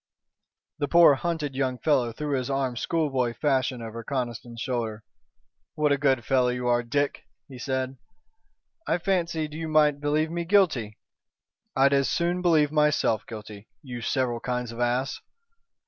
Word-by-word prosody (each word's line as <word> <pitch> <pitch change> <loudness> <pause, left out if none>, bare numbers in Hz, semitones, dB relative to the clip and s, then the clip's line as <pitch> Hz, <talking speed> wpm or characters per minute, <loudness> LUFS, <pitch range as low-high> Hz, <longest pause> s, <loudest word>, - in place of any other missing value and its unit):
The 145 - 0
poor, 170 0 +7
hunted 150 -1 -2
young 130 -1 -1
fellow 130 -5 +1
threw 145 +4 -3
his 130 -1 -2
arm 135 -2 -1
schoolboy 130 -3 0
fashion 130 -4 0
over 115 +1 -7
Conniston's 120 -3 -4
shoulder. 115 -4 -3 0.7
"What 150 -2 +2
a 140 - +3
good 135 -5 +2
fellow 130 -1 +3
you 125 0 -2
are, 120 0 +3
Dick!" 140 +4 -2 0.2
he 130 -3 -11
said. 130 +1 -2 0.9
"I 165 - +2
fancied 170 -4 -1
you 160 +1 -4
might 150 -2 +3
believe 155 +2 +1
me 170 0 -2
guilty." 165 - +2 0.8
"I'd 135 +1 +4
as 140 -1 +2
soon 175 +1 0
believe 155 -5 +3
myself 150 -7 +2
guilty, 105 -1 -9 0.2
you 125 -3 -7
several 120 -1 0
kinds 125 -1 -3
of 115 - -9
ass." 125 +2 0
135 Hz, 150 wpm, -26 LUFS, 120-150 Hz, 0.9 s, poor